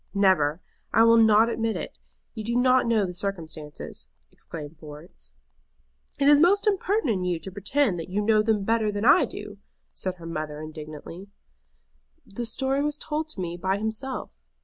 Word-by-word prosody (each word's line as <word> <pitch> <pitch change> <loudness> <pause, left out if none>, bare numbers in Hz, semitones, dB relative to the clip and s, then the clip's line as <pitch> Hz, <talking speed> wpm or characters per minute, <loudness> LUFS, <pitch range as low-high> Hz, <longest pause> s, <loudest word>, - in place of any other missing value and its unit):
"Never! 185 -5 +3 0.3
I 225 - +5
will 230 0 +6
not 220 0 +6
admit 225 -1 -1
it. - - -6 0.3
You 220 - -6
do 235 +2 -2
not 255 0 +4
know 220 -3 +2
the 180 - -5
circumstances," 165 -6 -6 0.2
exclaimed 155 -1 -9
Florence. 150 - -12 0.9
"It 280 - +3
is 290 0 +7
most 385 +6 +4
impertinent 395 - +1
in - - -3
you 180 -2 -1
to 175 +4 -8
pretend 205 +1 0
that 165 - -7
you 195 +3 -1
know 215 +1 +3
them 215 -2 +1
better 220 0 +1
than 205 +1 -3
I 265 - +6
do," - - -9 0.3
said 185 -1 -4
her 170 -2 -12
mother, 155 -2 -5
indignantly. 155 +4 -9 1.0
"The 235 +4 -5
story 265 +4 0
was 295 0 -1
told 305 +1 -3
to 260 -11 -5
me 175 -1 -4
by 190 +2 0
himself." 220 +5 -4
205 Hz, 170 wpm, -26 LUFS, 170-240 Hz, 1.0 s, is